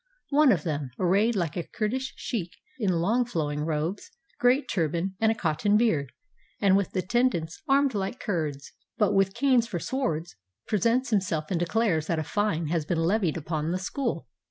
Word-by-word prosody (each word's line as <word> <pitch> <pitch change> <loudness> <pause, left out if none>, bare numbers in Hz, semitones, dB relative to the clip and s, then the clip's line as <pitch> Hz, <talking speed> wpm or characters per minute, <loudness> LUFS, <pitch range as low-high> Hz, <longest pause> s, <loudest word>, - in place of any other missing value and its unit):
One 290 -1 +6
of 170 -8 +1
them, 145 -4 -2
arrayed 200 +6 +2
like 170 -6 -1
a 175 - -1
Kurdish 250 +8 -3
sheik, 185 -9 -4 0.2
in 205 -5 +1
long 195 +9 +2
flowing 155 -10 -2
robes, 160 +5 -2 0.3
great 250 +4 +3
turban, 170 +2 -1
and 220 0 +4
a - - -1
cotton 205 +3 +1
beard, 160 - +1 0.5
and 195 -2 +4
with 200 -1 0
attend 240 +6 +2
ants 160 0 -5
armed 275 -1 +3
like 200 +4 -3
Kurds, 155 - -3 0.3
but 210 -2 +3
with 195 -1 +2
canes 255 -4 +3
for 195 - -3
swords, 175 - -2 0.3
pre 210 - -1
sents 245 +2 +2
himself 175 -7 0
and 175 - +1
declares 175 -3 +1
that 165 - 0
a 155 - -1
fine 170 -3 -1
has 165 -1 0
been 165 +3 -1
levied 170 0 +1
upon 155 0 -2
the 180 - 0
school. 260 +9 -3
190 Hz, 180 wpm, -27 LUFS, 165-230 Hz, 0.5 s, One